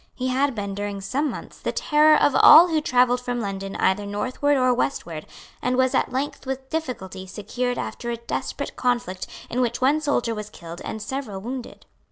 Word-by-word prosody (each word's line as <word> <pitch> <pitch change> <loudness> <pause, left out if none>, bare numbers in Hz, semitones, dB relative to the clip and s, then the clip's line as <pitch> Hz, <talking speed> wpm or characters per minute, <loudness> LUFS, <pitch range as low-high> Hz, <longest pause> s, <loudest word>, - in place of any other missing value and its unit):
He 255 0 -2
had 270 0 +1
been, 200 -2 -3
during 205 0 -4
some 270 +10 -1
months, - - -8
the - - -2
terror 305 0 +4
of 290 - +3
all 345 +3 +9
who 315 -2 +1
travelled 250 -2 +3
from 245 -1 -3
London 195 -2 -4
either 190 +2 +1
northward 255 +8 0
or 255 -1 +3
westward, 170 - -3 0.3
and 250 0 0
was 260 0 +3
at - - +1
length 265 +1 -3
with 265 0 -5
difficulty 195 -12 -4
secured 245 +6 -3
after 240 - -4
a 235 - -2
desperate 235 - -4
conflict 240 -7 -1 0.2
in 250 - -1
which 240 -1 0
one 280 +4 +3
soldier 265 -6 0
was 210 -1 -6
killed 170 -4 -10
and 220 - -5
several 260 -5 -4
wounded. 245 +4 -7
245 Hz, 190 wpm, -24 LUFS, 205-265 Hz, 0.3 s, all